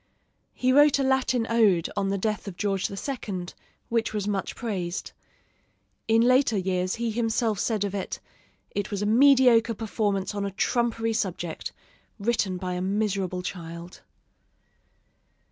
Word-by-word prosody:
He 255 Hz, +1 st, +2 dB
wrote 290 Hz, +1 st, +6 dB
a 275 Hz, -, 0 dB
Latin 265 Hz, -3 st, +1 dB
ode 210 Hz, -8 st, +3 dB
on 195 Hz, -1 st, 0 dB
the 200 Hz, -, 0 dB
death 210 Hz, +1 st, -2 dB
of 185 Hz, -3 st, -7 dB
George 195 Hz, -2 st, 0 dB
II., 200 Hz, -4 st, -4 dB, 0.4 s
which 230 Hz, -2 st, -1 dB
was 205 Hz, -1 st, -2 dB
much 200 Hz, -2 st, -2 dB
praised. 190 Hz, -7 st, -4 dB, 1.0 s
In 225 Hz, 0 st, +4 dB
later 255 Hz, -2 st, +4 dB
years 185 Hz, -1 st, 0 dB
he 230 Hz, -1 st, -2 dB
himself 225 Hz, -2 st, 0 dB
said 215 Hz, -1 st, 0 dB
of 200 Hz, -1 st, -2 dB
it, 195 Hz, -2 st, -4 dB, 0.5 s
"It 205 Hz, -1 st, -3 dB
was 205 Hz, -1 st, -2 dB
a -, -, 0 dB
mediocre 245 Hz, -1 st, +5 dB
performance 205 Hz, -3 st, -1 dB
on 205 Hz, -1 st, -2 dB
a 200 Hz, -, -1 dB
trumpery 225 Hz, +1 st, 0 dB
subject, 180 Hz, -6 st, -3 dB, 0.5 s
written 205 Hz, -3 st, 0 dB
by 180 Hz, 0 st, -3 dB
a 180 Hz, -, -3 dB
miserable 195 Hz, -2 st, -1 dB
child." 170 Hz, -1 st, -7 dB
210 Hz, 145 wpm, -26 LUFS, 190-230 Hz, 1.0 s, wrote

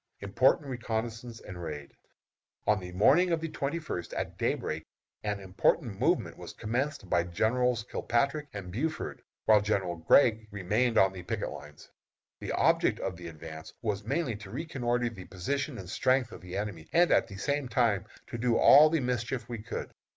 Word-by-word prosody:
IMPORTANT 125 Hz, +9 st, +3 dB
RECONNOISSANCE 115 Hz, -1 st, -4 dB
AND 90 Hz, -3 st, -8 dB
RAID. 75 Hz, -4 st, -6 dB, 0.7 s
On 105 Hz, 0 st, +3 dB
the 90 Hz, -1 st, -8 dB
morning 140 Hz, -, +5 dB
of 165 Hz, -, +2 dB
the 165 Hz, -, -3 dB
twenty 140 Hz, +2 st, -2 dB
first, 155 Hz, -, -5 dB
at -, -, -3 dB
day -, -, +1 dB
break, -, -, -4 dB, 0.4 s
an 105 Hz, -1 st, -1 dB
important 100 Hz, -, 0 dB
movement -, -, +1 dB
was -, -, -8 dB
commenced 130 Hz, +1 st, -2 dB
by 90 Hz, -1 st, +2 dB
Generals 115 Hz, +7 st, +1 dB
Kilpatrick 140 Hz, +5 st, 0 dB
and 100 Hz, -3 st, -7 dB
Buford, 155 Hz, -, -3 dB, 0.2 s
while 110 Hz, -2 st, +6 dB
General 95 Hz, -4 st, -1 dB
Gregg 110 Hz, -, +4 dB
remained 105 Hz, +5 st, 0 dB
on 95 Hz, 0 st, +5 dB
the 95 Hz, -, -7 dB
picket 90 Hz, -, -3 dB
lines. 75 Hz, +1 st, -11 dB, 0.5 s
The -, -, -4 dB
object -, -, +3 dB
of -, -, -3 dB
the 85 Hz, 0 st, -9 dB
advance 80 Hz, 0 st, -9 dB
was 105 Hz, -3 st, -1 dB
mainly 140 Hz, -5 st, -1 dB
to 105 Hz, -2 st, -11 dB
reconnoitre 125 Hz, -2 st, -1 dB
the 95 Hz, -5 st, -10 dB
position 135 Hz, -, -3 dB
and 95 Hz, -, -8 dB
strength 130 Hz, +4 st, +1 dB
of -, -, -10 dB
the 90 Hz, +1 st, -6 dB
enemy, 100 Hz, -6 st, -4 dB
and 175 Hz, +1 st, +4 dB
at -, -, +4 dB
the 100 Hz, -, -9 dB
same 140 Hz, +6 st, -1 dB
time 115 Hz, -6 st, +2 dB, 0.2 s
to 120 Hz, -, -6 dB
do 120 Hz, 0 st, +2 dB
all 150 Hz, +2 st, +8 dB
the 160 Hz, -1 st, +1 dB
mischief 125 Hz, -1 st, -2 dB
we 120 Hz, -2 st, -5 dB
could. 110 Hz, +2 st, -5 dB
110 Hz, 180 wpm, -30 LUFS, 95-130 Hz, 0.7 s, all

